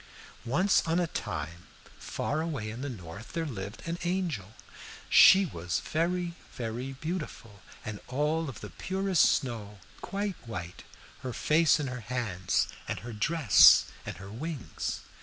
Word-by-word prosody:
"Once 180 Hz, +11 st, +3 dB
on 165 Hz, +2 st, +2 dB
a 175 Hz, -, +2 dB
time, 85 Hz, -, -5 dB, 0.3 s
far 155 Hz, +2 st, -2 dB
away 140 Hz, -10 st, -3 dB
in 115 Hz, +3 st, -7 dB
the 145 Hz, -, -3 dB
north, 100 Hz, -1 st, -9 dB
there 165 Hz, -1 st, -1 dB
lived 100 Hz, -6 st, -6 dB
an 170 Hz, +1 st, -3 dB
angel. 170 Hz, -, -2 dB, 0.5 s
She 195 Hz, +1 st, +8 dB
was 85 Hz, -, -3 dB
very, 170 Hz, +2 st, -1 dB, 0.2 s
very 120 Hz, +2 st, -4 dB
beautiful, 140 Hz, -, -6 dB, 0.2 s
and 105 Hz, -1 st, -5 dB
all 150 Hz, +4 st, 0 dB
of 130 Hz, -, -9 dB
the 105 Hz, -, -8 dB
purest 190 Hz, -3 st, +1 dB
snow, 110 Hz, -5 st, -1 dB, 0.2 s
quite 200 Hz, -2 st, -3 dB
white, 90 Hz, -5 st, -6 dB, 0.4 s
her 130 Hz, -2 st, -5 dB
face 155 Hz, +2 st, +4 dB
and 145 Hz, -, -2 dB
her 125 Hz, -1 st, -5 dB
hands 110 Hz, -6 st, -1 dB, 0.2 s
and -, -, -3 dB
her 120 Hz, 0 st, -7 dB
dress 135 Hz, -, +6 dB, 0.2 s
and -, -, -6 dB
her 95 Hz, +1 st, -10 dB
wings. 145 Hz, +3 st, -4 dB
130 Hz, 145 wpm, -29 LUFS, 105-165 Hz, 0.5 s, She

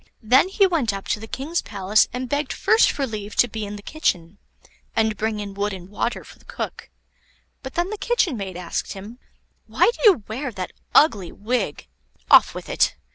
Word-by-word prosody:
Then 260 Hz, -, +5 dB
he 395 Hz, +1 st, +4 dB
went 320 Hz, -, +1 dB
up 195 Hz, 0 st, -6 dB
to -, -, 0 dB
the 225 Hz, -, -9 dB
king's 305 Hz, +8 st, -2 dB
palace 200 Hz, +1 st, +2 dB
and 250 Hz, +1 st, -4 dB
begged 285 Hz, +2 st, -1 dB
first 445 Hz, +1 st, +4 dB
for 280 Hz, -, -2 dB
leave 215 Hz, -3 st, -6 dB
to 245 Hz, -, +4 dB
be 215 Hz, -2 st, -5 dB
in 205 Hz, -, -6 dB
the 205 Hz, -, -10 dB
kitchen, 190 Hz, -, -2 dB, 0.6 s
and 220 Hz, -1 st, +2 dB
bring 215 Hz, +1 st, -2 dB
in 200 Hz, -1 st, -6 dB
wood 205 Hz, +1 st, -2 dB
and 185 Hz, -1 st, -9 dB
water 215 Hz, +3 st, -2 dB
for -, -, -16 dB
the -, -, -23 dB
cook, -, -, -6 dB, 0.7 s
but 265 Hz, -1 st, -8 dB
then 350 Hz, +3 st, 0 dB
the 425 Hz, -, -5 dB
kitchen 470 Hz, -, +1 dB
maid 190 Hz, -4 st, -5 dB
asked 180 Hz, -2 st, -4 dB
him: 210 Hz, +5 st, -10 dB, 0.5 s
"Why -, -, +3 dB
do -, -, -12 dB
you 295 Hz, -, +2 dB
wear 255 Hz, +4 st, -4 dB
that 185 Hz, -2 st, -5 dB, 0.2 s
ugly 205 Hz, -, +4 dB
wig? 210 Hz, -, -2 dB, 0.5 s
Off -, -, +7 dB
with -, -, -7 dB
it. -, -, +2 dB
220 Hz, 200 wpm, -23 LUFS, 200-280 Hz, 0.7 s, Off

